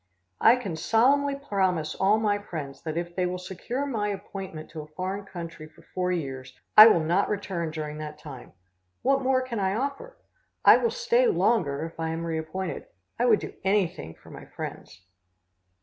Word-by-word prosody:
I 230 - +7
can 200 -10 -4
solemnly 275 - +3
promise 190 - -1
all 200 +3 +3
my 210 -2 +1
friends 155 -8 -7
that 160 -1 -4
if 175 0 -4
they 180 -1 +1
will 180 +1 -3
secure 190 +9 -4
my 220 -7 -1
appointment 195 -5 -6
to 160 - -6
a 150 - -11
foreign 190 +5 -4
country 170 -4 -8
for - - -21
four 180 0 0
years, 135 -6 -5 0.2
I 215 +1 +12
will 175 -7 +5
not 175 +5 +1
return 190 -5 -2
during 155 -1 -5
that 150 0 -7
time. 145 -4 -11 0.5
What 275 +1 +3
more 260 0 +2
can 240 -4 -4
I 190 0 0
offer? 280 - -4 0.5
I - - +9
will 470 - +1
stay 485 +1 +2
longer 165 - +1
if 165 0 -10
I 160 0 -1
am 165 +1 -3
reappointed. 165 +3 -4 0.3
I 245 - +3
would 230 -4 +5
do - - -7
anything 185 - 0
for - - -17
my - - -10
friends. 95 0 -8
185 Hz, 180 wpm, -26 LUFS, 160-225 Hz, 0.5 s, I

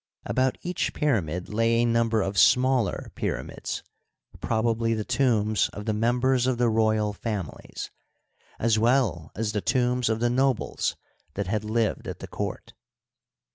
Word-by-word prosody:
About 130 0 +1
each 180 0 -2
pyramid 90 - 0
lay 115 +2 +2
a 120 +1 +3
number 115 -2 +2
of 95 +1 -3
smaller 125 0 +3
pyramids, - - -4 0.6
probably 115 0 0
the 110 -1 -3
tombs 110 -6 +2
of 105 - -7
the 110 - 0
members 125 +3 +2
of 130 -2 +1
the 120 -1 +3
royal 110 -1 +2
families, 100 -7 -5 0.7
as 110 -1 +2
well 115 - +1
as 110 0 -1
the 105 -1 -1
tombs 125 0 +1
of 110 0 0
the 120 +1 +1
nobles 130 -1 0 0.4
that 100 - -2
had 105 +3 -1
lived 110 0 -1
at - - -5
the - - -8
court. - - -5
115 Hz, 145 wpm, -26 LUFS, 105-125 Hz, 0.7 s, a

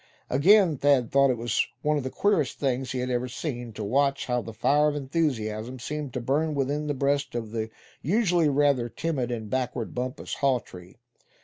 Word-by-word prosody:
Again 170 +3 +5
Thad 135 -4 +3
thought 140 0 +5
it 125 - +1 0.5
one 150 0 +2
of 145 - 0
the 130 - -3
queerest 185 -4 +1
things 130 -2 -1
he 130 - -3
had 125 0 -2
ever 125 +1 0
seen, 125 -2 -5
to 105 - -5
watch 140 +6 +1
how 125 -1 0
the 115 - -8
fire 145 +7 +3
of 150 - -3
enthusiasm 130 -6 -2
seemed 145 +2 -5
to - - 0
burn 150 +5 0
within 145 +2 -1
the 145 - -1
breast 140 0 0
of 115 -3 -4
the 110 -1 -3 0.3
usually 175 - +2
rather 140 -4 +2
timid 140 -4 -2
and 115 -3 -4
backward 125 -1 -2
Bumpus 125 +1 -4
Hawtree. 105 -10 -2
135 Hz, 185 wpm, -26 LUFS, 120-145 Hz, 0.5 s, Again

